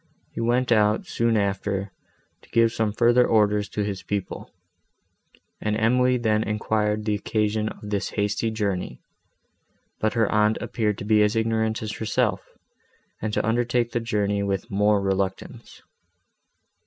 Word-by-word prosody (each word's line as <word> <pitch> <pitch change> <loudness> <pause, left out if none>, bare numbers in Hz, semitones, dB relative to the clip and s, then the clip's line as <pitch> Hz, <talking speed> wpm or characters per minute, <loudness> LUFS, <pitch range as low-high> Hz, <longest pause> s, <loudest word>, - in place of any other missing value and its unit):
He - - -4
went 120 +2 +1
out, 105 -1 +3
soon 115 -1 0
after, 100 0 -1 0.5
to - - -22
give 115 -1 +3
some 110 -2 -1
further 120 +3 +4
orders 105 -3 +2
to 105 - -2
his 100 -2 -4
people, 100 -3 -4 1.1
and 105 0 -1
Emily 125 +3 +3
then 110 -3 +1
enquired 105 0 -1
the 105 - +1
occasion 105 +1 -1
of 105 - -10
this 100 -1 -1
hasty 105 +2 -1
journey; 100 - -3 1.0
but 110 - 0
her 115 -2 +2
aunt 105 +1 +3
appeared 105 -4 -1
to - - -7
be 105 0 +4
as 105 +1 +2
ignorant 110 0 0
as 110 - -3
herself, 110 -2 0 0.8
and 110 - -2
to - - 0
undertake 120 +1 +1
the 120 - 0
journey 105 -3 -1
with 100 -1 -2
more 105 +1 +3
reluctance. 95 -1 -3
105 Hz, 145 wpm, -24 LUFS, 105-115 Hz, 1.1 s, further